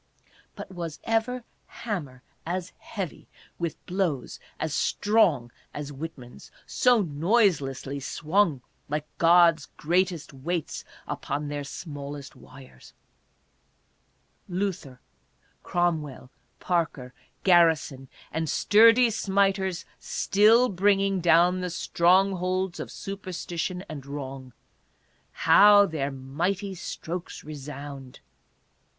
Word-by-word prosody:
But - - -9
was 170 -4 -6
ever 230 +2 0 0.2
hammer 145 - -6 0.2
as 180 +1 -4
heavy, 195 -7 -6 0.3
with 170 -2 -4
blows 175 -9 -2 0.2
as 155 -1 -2
strong 175 - +2 0.2
as 145 0 -5
Whitman's, 135 -4 -9 0.2
so 245 -4 +3
noiselessly 145 - +1
swung, 155 +1 0 0.3
like 150 +1 -2
God's 170 -2 +5
greatest 170 -2 0
weights 160 +4 -4 0.2
upon 145 +1 -4
their 145 0 -4
smallest 140 -2 -8
wires? 130 - -15 1.6
Luther, 175 -9 -3 0.6
Cromwell, 155 -7 -2 0.3
Parker, 160 -8 -2 0.3
Garrison 160 -7 +3 0.2
and 160 0 -2
sturdy 230 - +5
smiters 195 -3 0
still 220 +5 +4
bringing 195 0 +2
down 175 +2 +4
the 180 - -2
strongholds 185 +1 +1
of - - -5
superstition 185 -2 -5
and 150 -3 -7
wrong 135 -3 -7 0.4
— - - -40 0.2
how 205 0 +8
their 155 -6 -2
mighty 170 +9 -3
strokes 175 0 -6
resound 140 -2 -8
170 Hz, 95 wpm, -26 LUFS, 145-190 Hz, 1.6 s, how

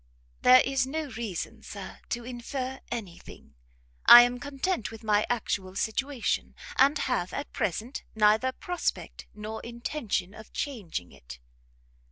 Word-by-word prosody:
"There 255 0 +8
is 265 -1 0
no 300 0 -3
reason, 220 -6 -5
Sir, - - -9
to 240 -1 -3
infer 255 +2 -5
any 205 -8 -5
thing; - - -14 0.5
I 240 - +12
am 245 0 -1
content 285 - -2
with 225 0 -11
my 210 -1 +2
actual 195 -5 -2
situation, 260 +5 -1 0.2
and 280 +3 +5
have, 245 -10 -1
at 285 - -5
present, 215 - -2
neither 220 +4 +4
prospect 355 +6 -4
nor 215 +1 -6
intention 235 -5 -3
of 220 0 -13
changing 195 - -4
it." 65 -3 -12
235 Hz, 135 wpm, -28 LUFS, 210-265 Hz, 0.5 s, I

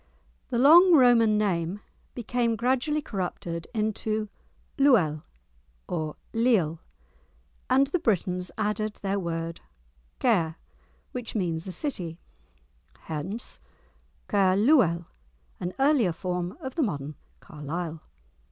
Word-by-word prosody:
The 240 - -1
long 340 +8 +8
Roman 240 -6 +5
name 185 -2 0 0.4
became 240 -1 0
gradually 260 +6 0
corrupted 175 -5 -4
into 215 -1 -1 0.5
"Luel," 190 - +4 0.7
or 155 -3 -3 0.2
"Liel," 220 -9 +2 0.9
and 270 +1 +5
the 315 +6 -1
Britons 180 - 0
added 210 0 -1
their 200 0 0
word 165 -1 -4 0.6
"Caer," 175 -10 +2 0.6
which 245 -2 -6
means 170 -4 -1
a - - -4
city, 180 - -4 0.8
hence 175 +9 -5 0.7
"Caer 190 -2 +3
luel"—an 170 - 0
earlier 270 - +3
form 180 +2 -3
of 260 -1 -5
the 330 - -1
modern 150 - -2 0.3
Carlisle. 160 +2 -6
200 Hz, 100 wpm, -27 LUFS, 170-240 Hz, 0.9 s, long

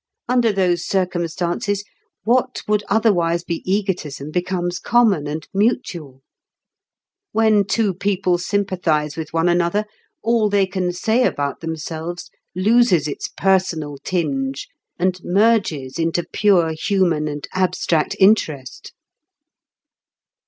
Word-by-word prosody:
Under 245 -2 +3
those 180 -3 +1
circumstances, 180 +2 -1 0.4
what 250 +4 +1
would 210 0 +1
otherwise 175 -6 +2
be 170 -1 -4
egotism 175 -8 -2
becomes 175 0 -2
common 215 -11 +2
and 155 +1 -5
mutual. 175 - -1 1.1
When 215 -2 +3
two 200 0 +1
people 185 -1 0
sympathise 175 -6 -1
with 160 -1 -6
one 165 +1 +1
another, 175 +4 +1 0.4
all 225 -2 +2
they 200 -1 +3
can 185 -1 -2
say 220 +7 +1
about 145 - -1
themselves 165 +1 -6 0.2
loses 195 -5 +3
its 145 - -4
personal 170 -7 0
tinge 135 -6 -2 0.3
and 185 +1 0
merges 185 - +1
into 165 +1 0
pure 185 -6 +3
human 170 -3 +1
and 145 -1 -5
abstract 180 -4 0
interest." 160 -10 +1
180 Hz, 110 wpm, -20 LUFS, 160-205 Hz, 1.1 s, Under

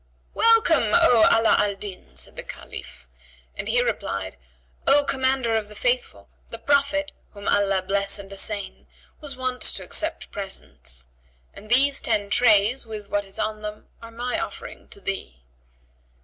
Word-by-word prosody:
"Welcome, 455 -4 +4
O 245 -10 +6
Ala 225 0 +4
Al 205 -1 +1
Din!" 185 - -9
said 65 - -5
the - - -5
Caliph, 60 - -10 0.5
and - - -4
he 245 +2 +3
replied, 95 - -3 0.5
"O 290 +1 +6
Commander 260 -4 +1
of 220 -2 -1
the 210 - -12
Faithful, - - -1 0.2
the 230 - -6
Prophet 285 +4 +1 0.2
(whom 200 0 -8
Allah 195 -2 +2
bless 200 +1 +1
and 200 -1 -10
assain!)[FN#77] 200 0 -5
was 280 -4 -5
wont 255 -1 -2
to - - +2
accept 320 +1 -2
presents; 190 - -4 0.5
and 215 - -13
these 275 +4 +4
ten 205 -3 0
trays, 225 +1 +4
with 215 -3 -8
what 205 0 0
is 195 - -9
on 215 0 -2
them, 210 0 -8
are 230 - -10
my 245 +6 -3
offering 340 - -7
to 405 - -12
thee." 65 - -6
220 Hz, 155 wpm, -24 LUFS, 200-270 Hz, 0.5 s, O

